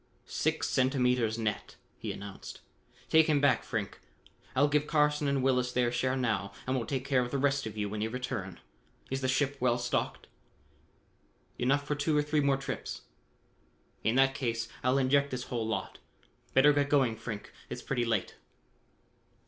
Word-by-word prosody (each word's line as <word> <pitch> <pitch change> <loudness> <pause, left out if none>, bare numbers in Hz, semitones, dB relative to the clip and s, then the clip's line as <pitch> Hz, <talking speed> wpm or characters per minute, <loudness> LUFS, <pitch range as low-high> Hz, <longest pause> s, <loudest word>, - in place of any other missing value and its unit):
"Six - - -1
centimeters 125 -4 +2
net," 110 -2 -3 0.2
he - - -4
announced. 100 -1 -8 0.5
"Take 160 0 +5
him 150 -2 +3
back, 140 -4 +3
Frink. 110 -5 -4 0.6
I'll 140 +3 +5
give 150 +1 +1
Carson 150 -1 +2
and 140 -2 +1
Willis 125 -2 +2
their 125 -1 +1
share 130 +2 0
now 100 -6 -1
and 130 - 0
we'll 120 -4 -2
take 130 0 -2
care 130 -2 +3
of 125 - -2
the 140 - -1
rest 140 -2 +1
of 110 - -8
you 105 -1 -1
when 105 +1 -4
you 110 - 0
return. 115 -7 -4 0.5
Is 135 0 -1
the 130 - 0
ship 140 +2 +1
well 120 -1 +2
stocked?" 120 0 -2 1.3
"Enough 135 +3 +2
for 150 - -1
two 150 +1 +1
or 150 - +3
three 150 0 +1
more 140 -1 +3
trips." 135 0 -5 1.0
"In 110 - +2
that 135 0 +4
case, 115 -5 -2 0.2
I'll 130 +2 +3
inject 140 +1 +3
this 125 -2 -4
whole 115 -2 -1
lot. 110 - -3 0.6
Better 145 +3 +7
get 145 0 +1
going, 135 -6 +3
Frink, 110 -2 -7 0.2
it's - - -6
pretty 125 -3 0
late." 115 -5 -1
130 Hz, 175 wpm, -30 LUFS, 115-140 Hz, 1.3 s, Better